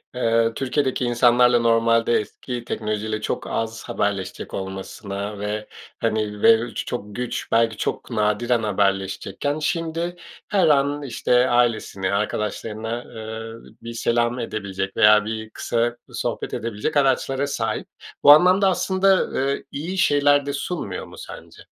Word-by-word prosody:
Eee, 115 -2 +2
Türkiye’deki 130 -1 0
insanlarla, 120 0 +4
normaldeki 115 +1 +1
teknoloji 110 -2 -3
ile 110 -1 -3
çok - - -3
az 115 0 -3
haberleşecek 100 -2 -3
olmasına 100 +1 -5
ve, 105 +1 -3 0.3
hani, 105 -2 -1
belki 115 +1 +3
çok 105 -4 -5
güç, 125 -1 -4
belki 115 -1 +2
çok - - -3
nadiren 115 +2 +1
haberleşecekken, 100 +6 -1
şimdi 165 +2 -2 0.3
her 195 -4 +3
an, 145 0 +2
işte, 125 -1 +2
ailesini, 110 -6 +1
arkadaşlarına, 110 +3 -3
eee, 110 0 -8
bir 115 0 -7
selam 120 +1 0
edebilecek 100 -4 -4
veya 105 0 +6
bir 110 0 -5
kısa 120 +2 -1
sohbet - - -4
edebilecek 115 +6 -2
araçlara 135 0 +1
sahip. 115 -5 -2 0.4
Bu 145 - +10
anlamda, 185 +5 +6
aslında, 190 +1 +2
eee, 140 - -3
iyi 170 +7 -4
şeyler 145 -4 +4
de 140 - -3
sunmuyor 140 - -4
mu - - -13
sence? - - -11
115 Hz, 125 wpm, -22 LUFS, 105-135 Hz, 0.4 s, Bu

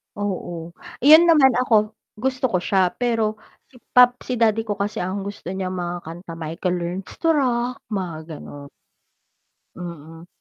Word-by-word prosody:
Oo. 175 -4 -4 0.3
Iyon 315 +5 +8
naman 300 -6 +6
ako, 220 -4 +3 0.2
gusto 260 +4 -1
ko 190 -6 0
siya 190 -1 +3
pero, 225 -3 0 0.3
si - - -25 0.2
pap 250 0 +7
si 250 -2 -3
daddy 225 -1 +3
ko 205 -2 -4
kasi 205 0 -2
ang 195 +2 -3
gusto 200 -3 -7
niya 190 -1 -3
mga 175 -1 -3
kanta 165 +2 -9
Michael 165 +3 -2
Learns 175 +2 -5
to 330 - +1
Rock, 250 -3 0
mga 165 -5 -5
gano'n. 140 0 -10 1.1
Mm. 165 -1 -9
200 Hz, 150 wpm, -22 LUFS, 175-240 Hz, 1.1 s, Iyon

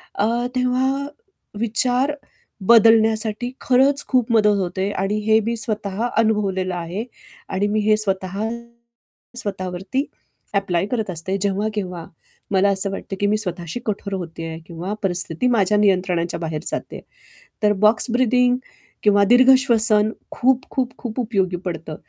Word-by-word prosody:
अ, 205 - +1 0.3
तेव्हा 260 +2 0 0.6
विचार 250 +4 +1 0.6
बदलण्यासाठी 225 +1 +4
खरंच 270 +3 +3
खूप 250 -3 +1
मदत 210 -2 +4
होते 190 +2 -2
आणि 210 +2 -1
हे 220 0 +5
मी 235 - -1
स्वतः 215 -1 -2
अनुभवलेलं 195 -4 +1
आहे. 175 +5 -4 0.5
आणि 200 +2 0
मी 215 +1 0
हे 215 - +5
स्वतः 195 -2 -2 1.0
स्वतःवरती 190 +4 -3 0.5
ॲप्लाय 190 -2 0
करत 220 -5 -2
असते, 185 +3 -3
जेव्हा-केव्हा 200 -3 -2 0.5
मला 195 +1 +3
असं 195 0 +3
वाटतं 195 0 -6
की 205 - +1
मी 215 +1 +2
स्वतःशी 175 -1 -4
कठोर 200 -1 -3
होते 165 -3 -5
आहे 160 0 -6
किंवा 175 +4 -5
परिस्थिती 180 +3 +1
माझ्या 210 -3 +2
नियंत्रणाच्या 180 -4 +1
बाहेर 160 -2 -4
जाते - - -4
आहे. - - -9 0.6
तर 210 0 +4
बॉक्स 220 +3 +3
ब्रीथिंग 250 0 +3 0.5
किंवा 205 -1 +4
दीर्घ 245 +4 +5
श्वसन 220 -4 +3 0.2
खूप, 260 +1 +1
खूप, 255 -1 -2
खूप 240 -1 -6
उपयोगी 195 -6 0
पडतं 165 -3 -5
210 Hz, 135 wpm, -21 LUFS, 185-235 Hz, 1.0 s, हे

